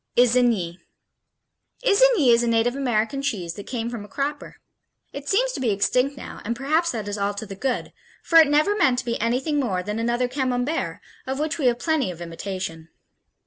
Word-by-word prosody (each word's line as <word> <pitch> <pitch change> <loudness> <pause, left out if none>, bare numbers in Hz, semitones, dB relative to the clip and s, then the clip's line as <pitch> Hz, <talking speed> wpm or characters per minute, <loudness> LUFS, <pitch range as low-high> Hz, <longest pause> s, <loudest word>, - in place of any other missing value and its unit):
Isigny 235 -8 +3 1.1
Isigny 435 - +5
is 235 - +4
a 240 - 0
native 230 +2 +2
American 255 0 0
cheese 200 -12 -2
that 200 +3 -10
came 235 -1 -3
a 210 -3 -6
cropper. 285 +3 -4 0.6
It 280 0 -6
seems - - +2
to - - -5
be 255 -3 0
extinct 250 +7 +1
now, - - -9
and 235 +3 -2
perhaps 310 +7 +1
that 220 -4 -4
is 205 0 -4
all 200 0 -1
to 205 - -5
the 200 - -8
good, 250 +5 -2 0.3
for 330 - +6
it 320 - +7
never 305 +8 +3
meant 345 -11 +3
to 250 - -2
be 235 -2 -2
anything 260 +6 0
more 190 -9 -1
than 210 +3 -3
another 240 +2 0
Camembert, 255 +3 -2 0.3
of 265 0 -2
which 310 +3 -2
we 270 - +2
have 240 -1 +2
plenty 310 - 0
of 175 -2 -7
imitation. 170 -1 -6
245 Hz, 190 wpm, -23 LUFS, 210-285 Hz, 1.1 s, it